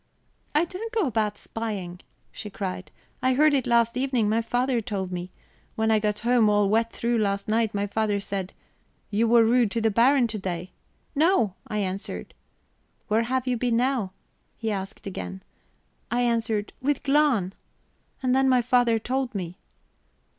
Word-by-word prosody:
"I 310 +3 +4
don't 420 +6 -6
go 435 -5 +1
about 215 -5 0
spying," 200 -7 -5 0.3
she 210 - -7
cried. 190 -2 -5 0.3
"I 255 0 +2
heard 305 +2 +5
it 270 -3 +1
last 235 0 +3
evening; 255 -4 +1
my 220 +2 +2
father 245 +1 0
told 195 -3 -4
me. 180 0 -4 0.5
When 220 0 +1
I 220 - +4
got 210 0 -1
home 235 -2 +4
all 205 -1 +3
wet 225 +2 +2
through 235 0 0
last 200 -1 -1
night, 220 -1 +1
my 200 0 0
father 205 0 0
said: 195 -1 -4 0.6
'You 220 +3 +2
were 230 0 +6
rude 235 -1 +3
to 230 - -1
the 225 0 +2
Baron 250 +4 +4
to 215 -1 -3
day.' 180 -1 -4 0.4
'No,' 310 - +3
I 210 - -3
answered. 195 0 -3 0.8
'Where 215 +2 +3
have 255 +2 -1
you 250 -1 0
been 235 -1 +1
now?' 245 -6 0 0.5
he 225 -2 -2
asked 195 +1 -5
again. 95 - -6 0.7
I 240 +3 +1
answered: 225 -3 0
'With 285 +1 0
Glahn.' 275 -10 +2 0.7
"And 255 0 +2
then 265 0 +4
my 250 -2 +4
father 245 -1 +3
told 255 +1 -2
me." 180 -2 -5
225 Hz, 170 wpm, -25 LUFS, 205-250 Hz, 0.8 s, were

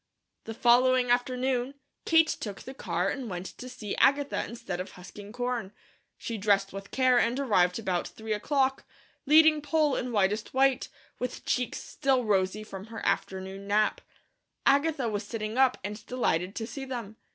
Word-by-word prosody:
The 225 - -6
following 245 +1 +4
afternoon, 250 +1 0 0.3
Kate 325 -1 +5
took 205 -9 -5
the 265 - -8
car 180 -6 -1
and 255 -2 -4
went 180 -1 -5
to 255 - -7
see 225 -5 -5
Agatha 280 +1 +3
instead 230 -7 -6
of 185 - -6
husking 200 +3 -11
corn. 245 -4 -3 0.4
She 230 -2 -5
dressed 195 -1 +2
with 195 0 -7
care 255 -2 +3
and 240 +3 +1
arrived 185 -9 +2
about 185 -6 -1
three 220 0 -5
o'clock, 270 +4 0 0.4
leading 310 0 +6
Poll 295 -1 +2
in 250 0 -3
whitest 210 +2 0
white, 265 -1 +3 0.3
with 250 0 -5
cheeks 250 -1 -1
still 265 -2 0
rosy 195 0 +1
from 195 -1 -9
her 225 0 -7
afternoon 190 +1 -2
nap. 210 +1 +2 0.6
Agatha 280 -1 +3
was 210 -1 -2
sitting 215 +1 -4
up 260 -1 +4
and 210 +2 -6
delighted 195 -7 0
to 225 - -3
see 260 +4 -7
them. 235 -5 -6
235 Hz, 165 wpm, -28 LUFS, 200-260 Hz, 0.6 s, leading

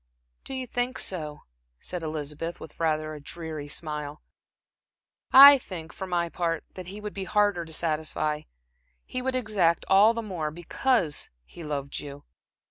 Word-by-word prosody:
"Do 270 - -7
you 260 -1 -3
think 245 +1 -2
so?" 155 -5 -2 0.4
said 180 -1 -5
Elizabeth, 155 +1 -4
with 160 - -12
rather 155 -1 0
a 150 - -8
dreary 155 -1 -6
smile. 150 -1 -5 1.1
"I 280 +1 +11
think, 170 -8 -8
for 190 - -6
my 175 -1 0
part, 165 -1 -2
that 185 -2 -8
he 200 +3 -8
would 210 0 -6
be 195 -1 -4
harder 205 -4 +2
to 160 - -11
satisfy, 155 -1 -1 0.6
he 255 - -4
would 260 0 -1
exact 205 -9 +2
all 205 +4 +6
the 230 - -3
more, 175 -7 -3
because 175 - 0 0.2
he 170 - -11
loved 140 -2 -4
you." 145 0 -9
170 Hz, 155 wpm, -27 LUFS, 155-205 Hz, 1.1 s, I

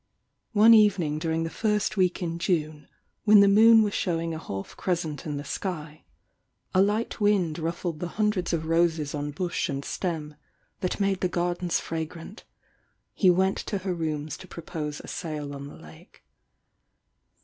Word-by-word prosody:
One 220 +2 +7
evening 195 -9 +4
during 160 0 -1
the 165 - -4
first 210 -2 0
week 185 -2 +1
in 165 0 -3
June, 155 -4 -1 0.4
when 210 -1 +7
the 200 - +6
moon 220 +2 +7
was 205 -2 -1
showing 165 -2 -1
a 160 - -5
half 95 -10 -7
crescent 165 -5 -3
in 145 -1 -3
the 145 - -5
sky, 155 -3 -5 0.7
a 185 - +5
light 210 +4 0
wind 190 -6 +2
ruffled 165 0 -3
the 175 - -3
hundreds 210 -2 0
of 160 -2 -1
roses 165 -2 +1
on 145 0 -3
bush 175 +4 -2
and 140 -1 -3
Steffi 155 -4 -4 0.4
that 185 - -2
made 195 -2 +1
the 185 - +1
gardens 175 0 -1
fragrant, 165 +5 -6 0.7
he 190 - +4
went 190 +2 +2
to 205 - -3
her 190 -1 -3
rouras 155 -3 -3
to 190 - -12
propose 155 -3 -6
a - - -12
sail 150 -4 -5
on 140 0 -7
the - - -11
lake. 80 0 -16
170 Hz, 165 wpm, -26 LUFS, 155-190 Hz, 0.7 s, One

